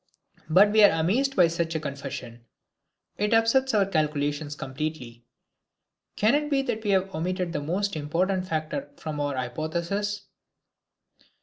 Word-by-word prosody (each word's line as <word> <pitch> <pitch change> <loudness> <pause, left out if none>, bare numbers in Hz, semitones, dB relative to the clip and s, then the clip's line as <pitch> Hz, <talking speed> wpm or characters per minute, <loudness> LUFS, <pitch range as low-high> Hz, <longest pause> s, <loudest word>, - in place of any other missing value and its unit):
But 195 +6 +6
we 215 0 +5
are 180 -5 +6
amazed 255 +12 +1
by 175 - +6
such 165 0 -2
a - - +1
confession; 140 -5 -7 0.8
it 210 +2 +2
upsets 230 +3 +3
our 200 -2 +4
calculations 150 -3 -1
completely. 130 -4 -6 0.9
Can 215 +3 +3
it 295 +1 +1
be 275 -2 +2
that 225 -4 -3
we 210 - -2
have 190 -1 +1
omitted 180 +2 -2
the 145 - -2
most 185 +6 -1
important 180 +5 -1
factor 160 - -3
from 155 - -5
our 145 -1 -1
hypothesis? 170 +11 -3
170 Hz, 140 wpm, -26 LUFS, 150-205 Hz, 0.9 s, But